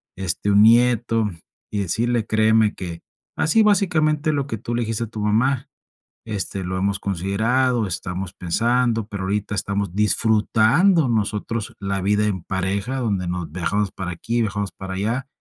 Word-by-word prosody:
este, 95 Hz, +2 st, -1 dB
un 100 Hz, +1 st, +6 dB
nieto, 115 Hz, -1 st, +4 dB, 0.4 s
y 105 Hz, -, -2 dB
decirle 115 Hz, +5 st, 0 dB
créeme 110 Hz, 0 st, +3 dB
que, 85 Hz, -3 st, -7 dB, 0.3 s
así 190 Hz, +8 st, +3 dB
básicamente 155 Hz, -7 st, +2 dB
lo 140 Hz, -2 st, -1 dB
que 115 Hz, -6 st, -4 dB
tú 120 Hz, +1 st, -4 dB
le 120 Hz, -, 0 dB
dijiste 115 Hz, +1 st, -2 dB
a -, -, -11 dB
tu 110 Hz, 0 st, -8 dB
mamá, 125 Hz, +6 st, +1 dB, 0.6 s
este, 100 Hz, -3 st, -3 dB
lo 95 Hz, +1 st, -3 dB
hemos 100 Hz, +1 st, 0 dB
considerado, 110 Hz, +6 st, 0 dB
estamos 90 Hz, +1 st, -4 dB
pensando, 115 Hz, +4 st, 0 dB
pero 100 Hz, -4 st, -5 dB
ahorita 100 Hz, +1 st, -2 dB
estamos 100 Hz, -2 st, -2 dB
disfrutando 110 Hz, -, +3 dB
nosotros 110 Hz, 0 st, -2 dB
la 100 Hz, -1 st, -2 dB
vida 105 Hz, +2 st, +2 dB
en 95 Hz, -5 st, -2 dB
pareja, 100 Hz, +7 st, -2 dB
donde 100 Hz, -7 st, -1 dB
nos 90 Hz, -2 st, -3 dB
viajamos 95 Hz, +4 st, -1 dB
para 90 Hz, -1 st, -4 dB
aquí, 115 Hz, +7 st, -2 dB
viajamos 100 Hz, -2 st, -2 dB
para 95 Hz, 0 st, -7 dB
allá. 115 Hz, +7 st, -2 dB
105 Hz, 155 wpm, -22 LUFS, 95-120 Hz, 0.6 s, un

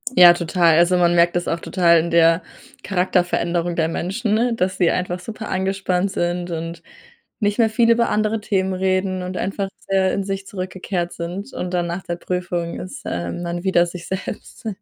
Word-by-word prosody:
Ja, 175 Hz, -3 st, +9 dB
total. 170 Hz, -1 st, +2 dB
Also, 175 Hz, +2 st, +4 dB
man 175 Hz, -1 st, +3 dB
merkt 170 Hz, 0 st, +4 dB
das 175 Hz, -, -1 dB
auch 165 Hz, -, -1 dB
total 170 Hz, -2 st, +3 dB
in 170 Hz, +1 st, -2 dB
der 165 Hz, +1 st, +5 dB, 0.4 s
Charakterveränderung 175 Hz, -2 st, 0 dB
der 160 Hz, -1 st, +1 dB
Menschen, 215 Hz, +7 st, 0 dB
dass 185 Hz, -2 st, -1 dB
sie 175 Hz, -3 st, +3 dB
einfach 180 Hz, 0 st, -2 dB
super 220 Hz, +3 st, -7 dB
angespannt 190 Hz, 0 st, 0 dB
sind 175 Hz, -1 st, -2 dB
und 165 Hz, 0 st, -5 dB, 0.6 s
nicht 205 Hz, 0 st, 0 dB
mehr 225 Hz, -1 st, +5 dB
viel 230 Hz, +1 st, +3 dB
über 235 Hz, 0 st, +3 dB
andere 215 Hz, +1 st, +1 dB
Themen 190 Hz, -2 st, 0 dB
reden 185 Hz, 0 st, 0 dB
und 180 Hz, 0 st, -5 dB
einfach 195 Hz, +1 st, -2 dB, 0.2 s
sehr 190 Hz, -1 st, +2 dB
in 200 Hz, -, -1 dB
sich 195 Hz, 0 st, -4 dB
zurückgekehrt 185 Hz, -2 st, -4 dB
sind. 180 Hz, +8 st, -6 dB
Und 180 Hz, 0 st, -4 dB
dann 175 Hz, -1 st, 0 dB
nach 175 Hz, +2 st, -4 dB
der 175 Hz, -, -3 dB
Prüfung 175 Hz, -1 st, -3 dB
ist, 185 Hz, -, -8 dB
ähm, 85 Hz, -, -3 dB
man 175 Hz, 0 st, -4 dB
wieder 185 Hz, -3 st, +3 dB
sich 175 Hz, 0 st, -8 dB
selbst. 190 Hz, +3 st, -6 dB
180 Hz, 180 wpm, -21 LUFS, 175-195 Hz, 0.6 s, Ja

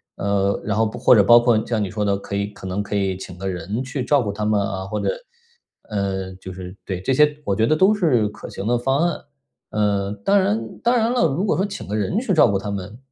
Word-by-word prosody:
呃， 100 Hz, 0 st, 0 dB
然 105 Hz, -1 st, -1 dB
后 110 Hz, 0 st, +3 dB
或 120 Hz, +2 st, +3 dB
者 110 Hz, -, +7 dB
包 120 Hz, +3 st, +7 dB
括 115 Hz, -2 st, +3 dB
像 110 Hz, -3 st, 0 dB
你 95 Hz, -, -4 dB
说 105 Hz, +1 st, -2 dB
的， 100 Hz, -1 st, +1 dB
可 100 Hz, 0 st, -6 dB
以 100 Hz, -, -1 dB
可 105 Hz, -2 st, -12 dB
能 95 Hz, +2 st, -2 dB
可 105 Hz, 0 st, -4 dB
以 95 Hz, -2 st, 0 dB
请 90 Hz, -1 st, -9 dB
个 95 Hz, +1 st, -3 dB
人 95 Hz, +7 st, -3 dB
去 135 Hz, 0 st, -4 dB
照 145 Hz, +1 st, +3 dB
顾 105 Hz, -4 st, -2 dB
他 105 Hz, +1 st, -4 dB
们 105 Hz, -1 st, +2 dB
啊， 100 Hz, -1 st, -3 dB
或 -, -, -3 dB
者， -, -, -1 dB, 0.8 s
呃， 95 Hz, -2 st, -2 dB
就 95 Hz, 0 st, -9 dB
是， 90 Hz, 0 st, -8 dB
对， 95 Hz, -2 st, -3 dB
这 130 Hz, -, 0 dB
些 150 Hz, +2 st, +3 dB
我 100 Hz, -, 0 dB
觉 110 Hz, -, +2 dB
得 155 Hz, -, +3 dB
都 190 Hz, +6 st, +4 dB
是 140 Hz, -, +2 dB
可 -, -, -10 dB
行 95 Hz, -, -6 dB
的 120 Hz, +1 st, +2 dB
方 135 Hz, +3 st, 0 dB
案。 170 Hz, -, -3 dB, 0.5 s
呃， 100 Hz, -2 st, 0 dB
当 200 Hz, +1 st, +5 dB
然 205 Hz, +3 st, -1 dB
当 240 Hz, +1 st, +3 dB
然 230 Hz, +1 st, +2 dB
了， 210 Hz, -10 st, +3 dB
如 160 Hz, +7 st, -1 dB
果 -, -, +1 dB
说 190 Hz, -, +1 dB
请 200 Hz, 0 st, -7 dB
个 105 Hz, -, -3 dB
人 110 Hz, -, 0 dB
去 230 Hz, -5 st, -1 dB
照 160 Hz, -, +6 dB
顾 100 Hz, -, +1 dB
他 105 Hz, -, -5 dB
们， 100 Hz, +2 st, -6 dB
105 Hz, 280 characters per minute, -21 LUFS, 100-135 Hz, 0.8 s, 者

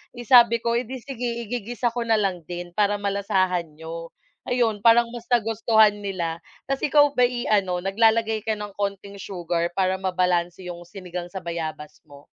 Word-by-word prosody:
Eh, 240 Hz, -, -7 dB
sabi 235 Hz, -1 st, +6 dB
ko, 235 Hz, -, 0 dB
eh 245 Hz, -, -2 dB
di 265 Hz, -, -6 dB
sige 250 Hz, -1 st, -6 dB, 0.2 s
igigisa 240 Hz, +2 st, -2 dB
ko 235 Hz, 0 st, -3 dB
na 225 Hz, -1 st, +3 dB
lang 180 Hz, -4 st, -2 dB
din 175 Hz, +1 st, -6 dB
para 205 Hz, 0 st, +3 dB
malasahan 195 Hz, -3 st, 0 dB
niyo. 165 Hz, +1 st, -8 dB, 0.3 s
Ayun 235 Hz, -4 st, +1 dB
parang 235 Hz, 0 st, +6 dB
mas 235 Hz, -1 st, -9 dB
nagustuhan 220 Hz, -2 st, +3 dB
nila. 170 Hz, -4 st, -2 dB, 0.3 s
Tas 275 Hz, 0 st, 0 dB
ikaw 290 Hz, -1 st, +5 dB
ba'y 245 Hz, -1 st, +1 dB
ano 190 Hz, -4 st, +1 dB
naglalagay 220 Hz, +2 st, +2 dB
ka 220 Hz, -, +1 dB
ng 210 Hz, 0 st, -6 dB
konting 200 Hz, 0 st, -4 dB
sugar 175 Hz, -3 st, -3 dB
para 190 Hz, 0 st, +1 dB
mabalanse 180 Hz, -1 st, 0 dB
'yong 175 Hz, 0 st, -8 dB
sinigang 180 Hz, -1 st, -7 dB
sa 190 Hz, -, -5 dB
bayabas 160 Hz, -3 st, -5 dB
mo? 145 Hz, -1 st, -15 dB
200 Hz, 170 wpm, -24 LUFS, 175-230 Hz, 0.3 s, sabi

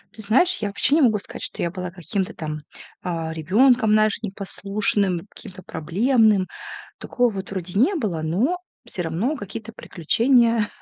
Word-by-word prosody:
Ты 220 Hz, -, -9 dB
знаешь, 265 Hz, -, +3 dB
я 205 Hz, -, -1 dB
вообще 255 Hz, +8 st, +2 dB
не 320 Hz, -, +4 dB
могу 220 Hz, -5 st, +3 dB
сказать, -, -, -9 dB
что -, -, -4 dB
я 170 Hz, -, 0 dB
была 180 Hz, 0 st, -6 dB
каким-то 190 Hz, +2 st, -3 dB
там, 155 Hz, -1 st, -5 dB, 0.4 s
а, 165 Hz, -2 st, -3 dB
ребенком, 220 Hz, -, +3 dB
знаешь, 215 Hz, 0 st, +3 dB
непослушным, 195 Hz, -2 st, -1 dB
каким-то 185 Hz, 0 st, -11 dB
проблемным. 210 Hz, -, +2 dB, 0.5 s
Такого 245 Hz, -2 st, +1 dB
вот 195 Hz, -2 st, -6 dB
вроде 185 Hz, -1 st, -4 dB
не 280 Hz, -, +3 dB
было, 205 Hz, -, -2 dB
но 205 Hz, -, 0 dB, 0.3 s
всё 185 Hz, -6 st, -5 dB
равно 190 Hz, -, -1 dB
какие-то 225 Hz, 0 st, -8 dB
приключения 230 Hz, -, +2 dB
205 Hz, 155 wpm, -22 LUFS, 180-230 Hz, 0.5 s, не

